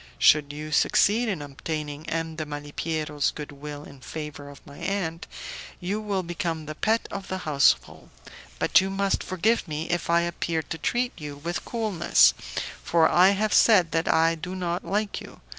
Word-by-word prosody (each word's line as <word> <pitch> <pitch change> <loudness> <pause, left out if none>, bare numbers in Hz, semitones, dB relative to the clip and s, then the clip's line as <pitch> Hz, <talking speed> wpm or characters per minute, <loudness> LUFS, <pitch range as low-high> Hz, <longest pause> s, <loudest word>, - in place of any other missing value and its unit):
Should 150 -1 +5
you 150 +1 -7
succeed 220 +9 +3
in 175 -8 -2
obtaining 150 +1 -5
M. 165 0 -2
de 155 - -3
Malipiero's 150 0 -2
good 150 -1 -7
will 145 +1 -8
in 140 - -13
favour 145 +1 -7
of 145 - -14
my 140 -1 -12
aunt, 180 -4 -2 0.5
you 200 +4 -2
will 200 -3 -1
become 165 -2 -3
the 155 - -5
pet 220 +8 0
of 195 -1 -5
the 185 - -3
household, 140 - +1 0.5
but - - +4
you 190 - -2
must 195 0 0
forgive 205 +4 0
me 155 +2 -3
if 175 0 -1
I 170 0 +4
appear 170 -1 -2
to 160 - -5
treat 240 +9 0
you 145 -1 -6
with 170 +5 -4
coolness, 190 - +3 0.5
for 165 -1 +4
I 180 +2 +6
have 215 +1 +1
said 185 -7 +5
that 165 0 +1
I 165 +1 +4
do 180 +3 -6
not 175 -1 -2
like 205 +1 -1
you. - - -12
165 Hz, 175 wpm, -26 LUFS, 150-190 Hz, 0.5 s, I